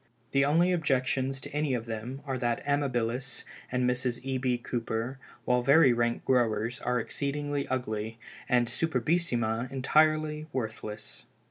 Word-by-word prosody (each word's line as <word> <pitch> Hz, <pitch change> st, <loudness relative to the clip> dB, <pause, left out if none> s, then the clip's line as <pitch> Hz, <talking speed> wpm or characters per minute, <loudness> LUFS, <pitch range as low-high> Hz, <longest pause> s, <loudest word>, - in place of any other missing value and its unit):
The 140 Hz, 0 st, +4 dB
only 165 Hz, +5 st, +4 dB
objections 135 Hz, -4 st, +1 dB
to -, -, -6 dB
any 150 Hz, -3 st, +1 dB
of 115 Hz, -2 st, -3 dB
them 115 Hz, +4 st, -5 dB
are 135 Hz, -2 st, -2 dB
that 120 Hz, +1 st, -1 dB
Amabilis 130 Hz, -3 st, 0 dB, 0.3 s
and 125 Hz, 0 st, +1 dB
Mrs. 125 Hz, -1 st, 0 dB
E. 135 Hz, -1 st, -1 dB
B. 125 Hz, -1 st, +1 dB
Cooper, 120 Hz, +1 st, -3 dB, 0.3 s
while 125 Hz, 0 st, +3 dB
very 135 Hz, 0 st, +6 dB
rank 120 Hz, 0 st, 0 dB
growers, 120 Hz, -1 st, +1 dB
are 125 Hz, 0 st, 0 dB
exceedingly 145 Hz, +3 st, -2 dB
ugly, 110 Hz, -3 st, -2 dB, 0.3 s
and 120 Hz, -1 st, +4 dB
Superbissima 125 Hz, -4 st, 0 dB
entirely 155 Hz, +3 st, +2 dB
worthless. 110 Hz, -4 st, -5 dB
130 Hz, 135 wpm, -29 LUFS, 120-140 Hz, 0.3 s, very